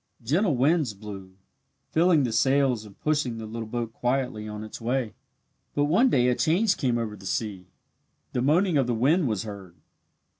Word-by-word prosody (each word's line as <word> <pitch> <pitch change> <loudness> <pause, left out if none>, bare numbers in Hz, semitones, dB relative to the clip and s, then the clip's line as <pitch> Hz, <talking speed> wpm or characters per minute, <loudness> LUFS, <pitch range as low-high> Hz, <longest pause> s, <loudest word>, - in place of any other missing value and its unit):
Gentle 155 - +2
winds 140 -3 +2
blew, 100 -2 -9 0.6
filling 165 -2 +4
the 120 - -1
sails 130 -1 +2
and 100 -2 -15
pushing 150 -6 0
the 110 - -6
little 110 +1 -6
boat 115 0 -4
quietly 125 -4 -1
on 105 0 -6
its 110 +2 -9
way. 120 -1 -1 0.6
But 145 - +2
one 205 - +4
day 125 - +3
a - - +3
change 190 - +2
came 125 -3 0
over 110 -3 -3
the 95 -1 -10
sea. 95 -3 -3 0.7
The 125 - 0
moaning 165 +5 +3
of 135 -3 +2
the 120 - 0
wind 145 +8 +3
was 105 -5 -1
heard. 100 -5 -9
120 Hz, 180 wpm, -26 LUFS, 110-145 Hz, 0.7 s, filling